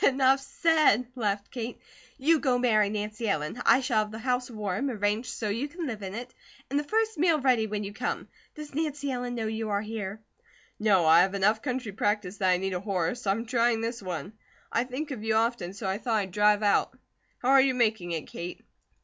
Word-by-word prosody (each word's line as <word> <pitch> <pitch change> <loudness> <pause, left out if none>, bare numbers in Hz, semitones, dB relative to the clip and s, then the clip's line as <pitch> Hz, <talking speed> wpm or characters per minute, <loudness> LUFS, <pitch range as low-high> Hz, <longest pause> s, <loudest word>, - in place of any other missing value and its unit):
"Enough 270 0 +4
said," 305 -4 +3
laughed 205 -5 -2
Kate. 240 -1 -5 0.4
"You 310 +4 +3
go 255 -4 +2
marry 215 -4 +3
Nancy 215 +1 -3
Ellen. 155 +3 -2
I 260 - +6
shall 245 -4 +1
have 215 0 -1
the 220 - -7
house 250 +1 -1
warm, 215 +3 -2
arranged 210 0 -1
so 215 - -3
you 235 +8 -1
can 335 +3 -6
live 225 -7 -4
in 195 0 -5
it, 245 +2 -7 0.4
and 285 - +2
the - - -2
first 440 +2 0
meal 330 -2 +4
ready 250 -5 +2
when 210 0 -3
you 200 0 -6
come. - - -3 0.3
Does 300 -2 -9
Nancy 290 -2 -2
Ellen 245 -1 -3
know 225 -2 -2
you 220 0 -3
are 200 0 0
here?" 215 -2 -5 0.6
"No. 200 -5 +4
I 165 +2 +7
have 190 +2 +1
enough 210 +3 +2
country 250 -5 -3
practice 205 -1 -1
that 190 -2 +2
I 180 - +4
need 190 +1 -2
a 180 - -1
horse; 195 +2 -2
I'm 210 +4 +1
trying 235 -1 +2
this 230 +1 -3
one. 185 +1 -5 0.4
I 235 - +1
think 275 +4 -5
of 230 -6 -5
you 220 0 +1
often 225 -5 0
so 200 - -7
I 190 +2 -1
thought 230 -2 -1
I'd 195 -3 -2
drive 210 +2 +3
out. 205 -1 +2 0.4
How 250 - -2
are 270 0 +7
you 260 -1 +2
making 220 -7 +1
it, 160 -3 -3
Kate?" 175 +1 -8
220 Hz, 215 wpm, -28 LUFS, 205-255 Hz, 0.6 s, I